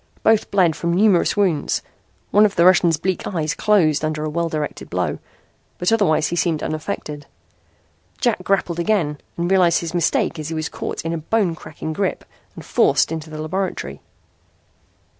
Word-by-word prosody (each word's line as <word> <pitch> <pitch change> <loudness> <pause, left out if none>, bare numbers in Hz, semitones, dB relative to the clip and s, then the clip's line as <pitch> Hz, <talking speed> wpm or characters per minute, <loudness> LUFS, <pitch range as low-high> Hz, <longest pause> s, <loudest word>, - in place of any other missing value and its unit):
Both 220 -1 +3
bled 180 -5 +3
from 170 0 -1
numerous 200 -1 +3
wounds. 185 -7 +1 0.5
One 210 - +6
of 205 -2 +2
the 170 - +4
Russian's 175 -3 +5
bleak 185 +3 -2
eyes 155 -5 -1
closed 165 -9 +2
under 155 0 -2
a 155 - -2
well 170 +1 -1
directed 150 -2 -4
blow, - - -2 0.6
but 180 - 0
otherwise 170 -9 +2
he - - -2
seemed 165 -2 0
unaffected. 155 -2 -5 0.9
Jack 235 -8 0
grappled 180 -3 0
again 170 -6 0 0.2
and 170 +2 -1
realized 180 -3 +4
his 170 -1 -5
mistake 170 -1 0
as 155 - -5
he 165 - -4
was 155 0 -2
caught - - -5
in 165 - -1
a 165 - -2
bone 190 +2 0
cracking 155 0 -7
grip 190 +3 -2 0.3
and - - -10
forced - - +2
into 160 -1 -5
the 155 0 -7
laboratory. 185 +5 -3
170 Hz, 170 wpm, -21 LUFS, 155-190 Hz, 0.9 s, One